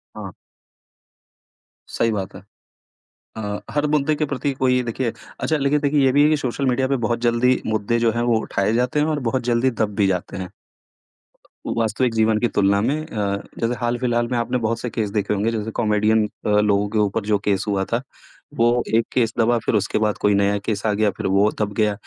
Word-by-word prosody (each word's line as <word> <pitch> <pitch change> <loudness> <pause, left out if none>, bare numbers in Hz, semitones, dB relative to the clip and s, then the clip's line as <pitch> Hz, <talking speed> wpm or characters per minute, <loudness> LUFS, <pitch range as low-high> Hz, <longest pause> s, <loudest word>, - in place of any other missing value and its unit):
हाँ। - - -8 1.5
सही 115 - 0
बात 100 -3 -4
है। - - -10 1.0
अ, 105 -2 -4
हर 145 0 0
मुद्दे 150 0 +2
के 155 - 0
प्रति 140 0 -2
कोई 125 -1 +2
देखिए 120 0 -2 0.3
अच्छा 160 - 0
लेकिन 145 +1 +1
देखिए 145 -1 +2
ये 130 - +4
भी 145 +2 +4
है 150 - +5
कि 155 - +3
सोशल 135 -1 -2
मीडिया 130 +1 +1
पे 135 - +1
बहुत 120 0 0
जल्दी 120 +2 +2
मुद्दे 110 +1 0
जो 115 -1 +2
हैं, 120 +2 -1
वो 120 -2 +2
उठाए 100 -1 -1
जाते 125 +4 0
हैं 150 - +2
और 155 -2 0
बहुत 130 +2 -1
जल्दी 120 +2 +2
दब 110 -4 -2
भी 100 -1 +2
जाते 95 0 -2
हैं। 95 -2 -6 1.2
वो - - -2
वास्तविक 115 +2 0
जीवन 110 -1 +2
की 120 - +2
तुलना 100 0 +3
में 130 +7 +1
अ, 100 -7 -2 0.2
जैसे 115 +1 0
हाल-फिलहाल 120 0 0
में 125 - +1
आपने 120 +2 0
बहुत 115 +1 -1
से 120 - -4
केस 110 -3 -2
देखे 105 -1 -1
होंगे, 105 +3 0
जैसे 110 -1 -3
कॉमेडियन 105 0 +2 0.2
अ, - - 0
लोगों 105 -1 +2
के 110 - -2
ऊपर 105 +1 0
जो 105 0 +2
केस 100 -1 +1
हुआ 100 -2 0
था, 115 - +1 0.5
वो 120 +1 +2
एक 115 - +3
केस 115 -2 +1
दबा, 120 +1 +3
फिर - - -1
उसके 105 - 0
बाद 105 -1 0
कोई 105 - +2
नया 100 0 +2
केस 105 -2 -2
आ 105 - +2
गया 105 0 +2
फिर - - -2
वो 100 +2 +3
दब 105 -1 -1
गया 105 -1 +2
115 Hz, 215 wpm, -21 LUFS, 105-125 Hz, 1.5 s, है